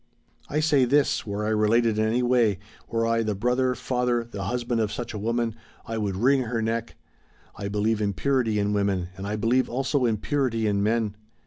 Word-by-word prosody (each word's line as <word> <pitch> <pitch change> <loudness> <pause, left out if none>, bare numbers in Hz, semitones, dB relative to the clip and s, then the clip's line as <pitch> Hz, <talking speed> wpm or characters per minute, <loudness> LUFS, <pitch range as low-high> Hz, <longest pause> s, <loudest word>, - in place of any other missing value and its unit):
"I 150 +2 0
say 145 -4 +4
this, 140 -2 +2
were 105 +1 -2
I - - 0
related 110 +1 +2
in 110 - +2
any 120 +3 +1
way, 120 -5 +3 0.3
were 115 0 0
I 115 0 +2
the 110 -2 -1
brother, 125 +4 +1
father, 125 -2 0
the 100 -4 -6
husband 120 +1 -1
of 105 -2 -1
such 120 -2 -5
a 105 - -4
woman, 115 +1 -1 0.3
I 115 0 -3
would 100 -3 -1
wring 130 +7 +3
her 120 -1 -2
neck. 115 +1 -2 0.6
I 100 - -5
believe 105 +2 0
in 100 -1 0
purity 125 -2 +1
in 105 0 +1
women, 100 -3 0
and 95 +1 -6
I 105 - -2
believe 120 +4 +1
also 135 +1 0
in 110 -2 +1
purity 120 -2 0
in 100 -1 +1
men." 110 0 0
115 Hz, 205 wpm, -25 LUFS, 105-125 Hz, 0.6 s, say